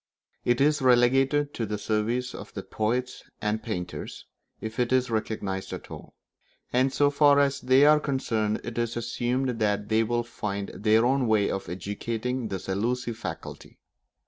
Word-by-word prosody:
It 120 0 +2
is 150 +1 +3
relegated 135 +3 +3
to 115 - -3
the 105 0 -2
service 115 +4 -1
of - - -9
the - - -4
poets 125 +4 -2 0.2
and 105 +1 -1
painters 90 -6 -5 0.3
if 110 +1 -6
it 125 0 +1
is 130 -1 +2
recognised 105 -3 -3
at - - -8
all; - - -10 0.6
and 130 +2 +3
so 145 +1 +3
far 145 0 +5
as 140 0 +2
they 130 +3 +5
are 150 0 +6
concerned 115 -7 -1
it 120 -1 -4
is 115 0 -1
assumed 120 +1 -1
that 105 -1 0
they 110 0 +3
will 120 +1 0
find 100 -4 -4
their 110 +2 +3
own 130 0 +2
way 110 -2 +2
of 95 -4 -4
educating 110 +7 -3
this 95 -3 -5
elusive 115 +4 -1
faculty. - - -7
120 Hz, 165 wpm, -27 LUFS, 105-130 Hz, 0.6 s, are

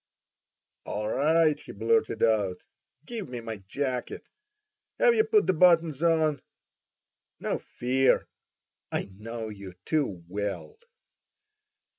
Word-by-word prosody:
"All 105 +1 -3
right!" 155 +5 +3
he - - -10
blurted 455 -1 +1
out; 100 -5 +1 0.4
"give 225 - -5
me 125 -1 -5
my 115 -1 -6
jacket. 125 +6 -4 0.7
Have 480 - +5
you 440 -1 +4
put 435 -2 +3
the - - +3
buttons 165 -4 +4
on? 160 -4 +2 1.0
No - - -2
fear! 130 +2 +1 0.6
I - - -3
know 115 +2 -6
you 100 -3 -9
too 135 - -1
well!" 105 - -4
135 Hz, 110 wpm, -28 LUFS, 105-165 Hz, 1.0 s, Have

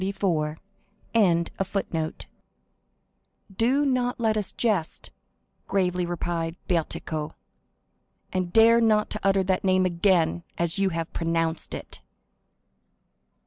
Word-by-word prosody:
27 175 -6 -1 3.0
"Do 260 +7 +2
not 250 -3 0
let 220 -2 +2
us 210 -2 -2
jest," 205 -9 -1 0.6
gravely 180 -2 0
replied 170 -1 -2
Bertuccio, 160 -2 -2 1.0
"and 185 -2 -1
dare 230 +2 +6
not 215 -2 +2
to 215 - -3
utter 195 0 +3
that 185 0 0
name 185 -1 +3
again 175 -2 +2 0.2
as 170 +3 0
you 195 -1 +3
have 165 -1 -4
pronounced 165 -1 -1
it." - - -9
185 Hz, 100 wpm, -26 LUFS, 165-210 Hz, 3.0 s, dare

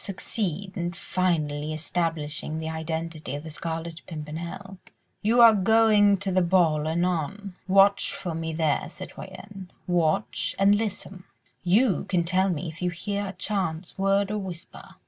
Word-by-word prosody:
—succeed 195 -1 -3
in 175 -1 -2
finally 155 -4 -1
establishing 155 -1 -2
the 160 0 -4
identity 160 -1 -4
of 145 - -6
the 160 - -8
Scarlet 165 +1 -5
Pimpernel.... 170 +5 -7 0.4
You 230 +3 +4
are 230 -1 +9
going 210 0 +5
to 195 0 -3
the 185 0 +3
ball 170 -4 +3
anon.... 180 +4 -1
Watch 195 +1 +4
for 175 -3 -4
me 160 0 -3
there, 160 -2 0
citoyenne, 195 -2 -9 0.2
watch 170 -3 0
and 195 +1 +5
listen.... 205 -3 -3 0.4
You 195 +4 +3
can 175 -2 +1
tell 185 +3 +2
me 170 -1 -2
if 160 +2 -8
you 180 - +1
hear 200 +4 -3
a 190 - -6
chance 185 -3 -2
word 195 +1 +2
or 210 - -1
whisper. 180 -4 -9
180 Hz, 145 wpm, -26 LUFS, 160-195 Hz, 0.4 s, are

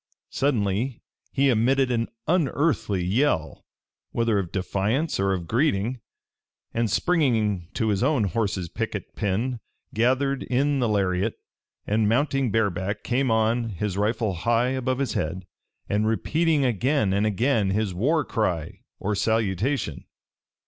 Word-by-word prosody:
Suddenly 115 -2 0 0.3
he 140 0 +2
emitted 125 +3 +2
an 115 -1 0 0.2
unearthly 145 - +1
yell, 100 - 0 0.4
whether 115 -3 +1
of 90 -3 -4
defiance 100 - -1
or 95 0 +2
of 90 -3 -2
greeting, 120 - 0 0.7
and 115 -1 0
springing 110 - +1
to 110 - 0
his 100 -1 +1
own 130 -2 +2
horse's 100 -3 -1
picket - - -5
pin 115 +5 -1 0.3
gathered 130 +4 +1
in 140 +3 +1
the 120 -3 +1
lariat, 100 +1 0 0.5
and 105 0 +2
mounting 135 +1 +1
bareback 100 -1 -1
came 130 +2 +1
on, 115 +1 +1
his 100 0 -3
rifle 105 0 0
high 115 +7 +1
above 130 -1 -1
his 140 -1 -1
head, 90 +4 -3 0.4
and 105 +1 +1
repeating 150 +6 +1
again 125 -2 +1
and 100 +2 +2
again 110 0 +1
his 100 0 0
war 145 - +1
cry 90 -9 -2 0.2
or 105 - -2
salutation. 110 - 0
115 Hz, 130 wpm, -25 LUFS, 100-130 Hz, 0.7 s, he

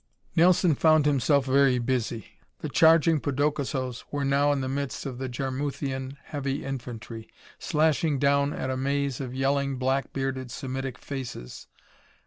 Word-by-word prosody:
Nelson 175 0 +5
found 155 +1 +4
himself 140 -1 +3
very 135 -1 +4
busy. 120 -2 -3 0.2
The - - -3
charging 165 -1 +5
podokesos 140 -3 -1
were 145 -1 -2
now 140 +1 +3
in 140 -2 0
the 130 - -2
midst 140 0 -3
of 130 -3 -5
the 130 -1 -3
Jarmuthian 135 +1 -3
heavy 140 -2 -3
infantry, 120 -4 -6 0.3
slashing 155 -1 +1
down 140 +1 +2
at 130 - -3
a 130 - -2
maze 140 0 -1
of 130 -1 -5
yelling, 140 0 0
black 130 +2 0
bearded, 135 -1 -3
Semitic 130 0 -5
faces. 130 - -7
135 Hz, 140 wpm, -27 LUFS, 130-145 Hz, 0.3 s, Nelson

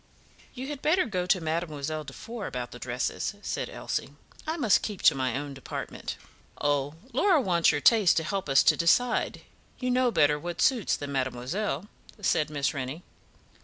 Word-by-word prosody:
"You 255 +1 -5
had 290 -2 -5
better 355 +3 +3
go 185 -6 -2
to 185 - +3
Mademoiselle 155 -2 -3
Defour 205 - -7
about 125 -1 -5
the 120 - -9
dresses," 125 - -2
said - - -3
Elsie. - - -4 0.3
"I 320 +2 -1
must 235 -10 +4
keep 205 -4 -5
to - - +7
my 130 -2 -1
own 145 0 -5
department." 135 - -6 0.4
"Oh, 145 0 0 0.2
Laura 335 - +4
wants 175 -8 +3
your 145 - -1
taste 215 -3 +5
to 160 - +2
help 195 -1 -3
us 135 - +6
to - - +5
decide; 240 +9 +2 0.4
you 250 -1 -1
know 250 0 +3
better 150 -8 +3
what 175 +3 -5
suits 250 -6 +3
than 145 -1 -6
mademoiselle," 135 - -2 0.3
said 155 -6 +1
Miss 145 -2 -1
Rennie. 140 +4 -5
165 Hz, 170 wpm, -28 LUFS, 140-220 Hz, 0.4 s, to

